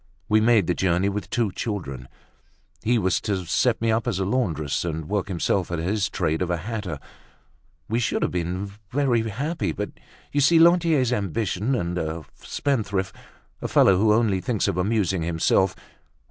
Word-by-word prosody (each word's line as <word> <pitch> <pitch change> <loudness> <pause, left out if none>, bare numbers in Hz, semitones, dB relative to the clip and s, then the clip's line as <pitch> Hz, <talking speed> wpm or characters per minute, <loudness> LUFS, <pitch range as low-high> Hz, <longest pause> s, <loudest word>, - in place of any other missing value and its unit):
We 110 +1 +4
made 110 -4 +4
the 90 - +1
journey 90 +2 +1
with 100 +1 -4
two 115 -5 0
children. 85 - -5 0.7
He 120 +2 +2
was 95 -4 +1
to 95 -4 -2
set 115 +7 +1
me 115 0 +1
up 115 +2 0
as 110 -6 0
a 95 - 0
laundress, 90 - -1
and 80 -2 -4
work 100 -1 -1
himself 95 +1 0
at 85 - -1
his 100 +5 0
trade 80 -4 -1
of 90 - -1
a 85 - 0
hatter. 100 -3 -4 0.9
We 115 +2 0
should 120 - 0
have - - 0
been 90 +3 -3 0.2
very 130 -4 +2
happy; 115 - -2
but, - - -4 0.4
you 145 - +1
see, 165 +5 +5
Lantier's 165 -7 +4
ambitious 100 -2 -2
and 95 -8 0
a 80 -1 -4
spendthrift, 100 -9 -2 0.5
a - - -2
fellow 95 - +5
who 105 +3 +3
only 105 -4 +2
thinks 105 +2 0
of 100 - 0
amusing 95 -2 0
himself. 85 +3 +2
100 Hz, 175 wpm, -24 LUFS, 90-115 Hz, 0.9 s, see